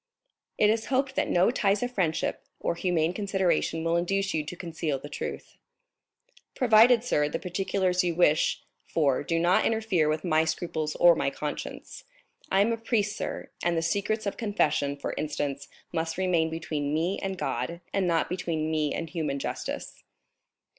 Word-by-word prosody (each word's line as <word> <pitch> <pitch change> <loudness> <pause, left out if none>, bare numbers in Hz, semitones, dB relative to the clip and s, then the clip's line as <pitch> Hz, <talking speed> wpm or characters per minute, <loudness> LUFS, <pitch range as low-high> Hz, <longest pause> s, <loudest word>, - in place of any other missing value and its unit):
It 210 0 +5
is 225 0 -1
hoped 265 0 +1
that - - 0
no 180 +5 +4
ties 205 -2 +1
of 245 - -2
friendship 175 -9 -1 0.2
or - - 0
humane 170 -1 0
consideration 185 -5 0
will 165 +1 +2
induce 195 +3 0
you 155 - 0
to 155 +4 -7
conceal 165 -4 -3
the 145 +2 -9
truth." - - -6 1.0
"Provided, 235 -1 +6
sir, 150 -12 +1
the - - -2
particulars 185 0 0
you 175 -2 0
wish 155 -3 +3 0.2
for 140 -5 +1
do 165 +3 -1
not 175 +2 +3
interfere 215 -9 +1
with 155 0 -1
my 160 -3 +3
scruples 160 -1 -2
or 175 -1 +7
my 140 - 0
conscience. 150 +1 -6 0.5
I 195 - +4
am 230 +3 +3
a - - -2
priest, 220 -3 0
sir, - - -5
and 170 -1 +1
the 165 - 0
secrets 205 +6 -1
of 200 - -3
confession, 200 -10 0
for 140 - -4
instance, 145 -2 -3 0.3
must 160 0 -2
remain 175 -4 +2
between 155 -3 -2
me 170 +5 0
and 195 -1 -3
God, 135 +3 -3
and 195 -2 +1
not 165 -2 +2
between 165 -3 -2
me 155 -2 0
and 165 - -3
human 155 -4 -2
justice." - - -5
170 Hz, 170 wpm, -27 LUFS, 155-195 Hz, 1.0 s, or